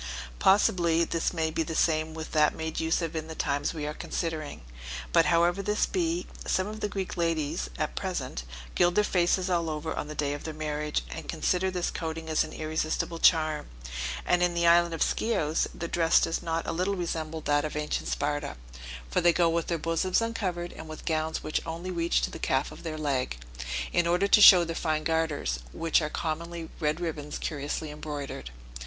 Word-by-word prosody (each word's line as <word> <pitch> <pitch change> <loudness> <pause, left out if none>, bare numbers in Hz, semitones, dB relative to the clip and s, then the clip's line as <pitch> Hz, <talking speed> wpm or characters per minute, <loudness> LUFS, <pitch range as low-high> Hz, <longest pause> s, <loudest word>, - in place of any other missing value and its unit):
Possibly 170 -4 +4
this 165 0 0
may 160 -2 -1
be 160 - -1
the 165 0 -3
same 155 -1 +1
with 160 0 -6
that 150 -1 +3
made 160 0 -3
use 160 +2 +1
of 165 0 -3
in 160 0 -3
the 160 - -7
times 145 -1 0
we 155 -2 -4
are 150 - -3
considering; 155 - -4 0.5
but - - +6
however 175 +3 +3
this 210 +1 +1
be, 175 -1 -1 0.2
some 185 - +1
of 215 +1 -6
the 210 - -1
Greek 195 -2 -4
ladies 155 - 0
at - - -2
present - - -3 0.3
gild 175 0 +3
their 210 - +5
faces 180 -1 +2
all 170 -3 +1
over 155 +1 -3
on - - -3
the 155 - -7
day 145 -1 0
of 145 - -6
their 160 -1 -5
marriage, 150 - -2
and - - -7
consider 185 +1 +1
this 180 -2 -1
coating 160 -1 -4
as 155 - +3
an - - -8
irresistible 160 +1 -2
charm; 155 -3 +3 0.6
and 175 - +3
in 175 -1 +2
the 170 0 +2
island 170 0 +5
of - - +2
Scios, 160 -9 +1
their 170 - -5
dress 165 -1 +4
does 165 - 0
not 165 0 -2
a - - -2
little 185 +4 0
resemble 160 -3 -3
that 145 -1 +2
of 155 - -4
ancient 150 0 -2
Sparta, 145 0 -1 0.6
for - - +2
they 175 - +6
go 170 0 +3
with 170 0 0
their 170 - 0
bosoms 165 +3 +1
uncovered, 190 -7 -2
and 160 - -9
with 155 - -8
gowns 160 -1 -1
which 155 - -1
only 170 +3 -5
reach 170 -1 +1
to - - -1
the - - -7
calf 135 +1 0
of - - -11
their 160 -2 -4
leg, 135 - -1 0.6
in 175 - +3
order 180 +3 +3
to 210 - +6
show 185 -3 +10
their 165 0 -4
fine 155 -2 0
garters, 155 - 0
which 165 0 +2
are 150 - -1
commonly 165 +1 -4
red 155 0 0
ribbons 150 -4 -4
curiously 150 0 -3
embroidered. 145 - -6
165 Hz, 200 wpm, -28 LUFS, 155-175 Hz, 0.6 s, show